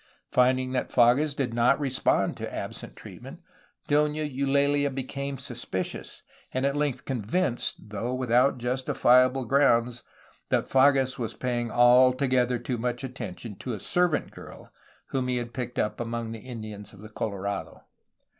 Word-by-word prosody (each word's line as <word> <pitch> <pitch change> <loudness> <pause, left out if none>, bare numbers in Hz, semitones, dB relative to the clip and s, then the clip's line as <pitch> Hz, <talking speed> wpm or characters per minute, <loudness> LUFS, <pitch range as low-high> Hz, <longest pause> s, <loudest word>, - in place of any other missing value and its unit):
Finding 130 0 +2
that 130 -1 -1
Fages 130 +5 +3
did 130 -5 -2
not 120 +4 +3
respond 135 -3 +1
to - - -5
absent - - -6
treatment. - - -11 0.5
Dona 150 +1 +2
Eulalia 140 0 +1
became 140 +1 -4
suspicious, - - -5 0.3
and 130 +1 -1
at 140 0 +1
length 145 -3 -1
convinced, 120 - -1
though 105 +4 -3
without 125 +1 +2
justifiable 125 +1 +2
grounds, 120 -2 +2 0.5
that - - +1
Fages 135 -1 +3
was 115 -2 -3
paying 120 -2 -2
altogether 125 +1 +4
too 120 0 -4
much 120 +2 -2
attention 115 -5 -7
to 125 -3 -4
a - - -8
servant 175 - 0
girl - - -12 0.4
whom 130 -2 -1
he 125 -1 0
had 120 -1 -5
picked 125 -1 -5
up 105 - -1
among 115 -1 -3
the 115 - -6
Indians 110 -4 -8
of 100 - -14
the 110 - -10
Colorado. 100 -2 -4
125 Hz, 145 wpm, -27 LUFS, 120-135 Hz, 0.5 s, altogether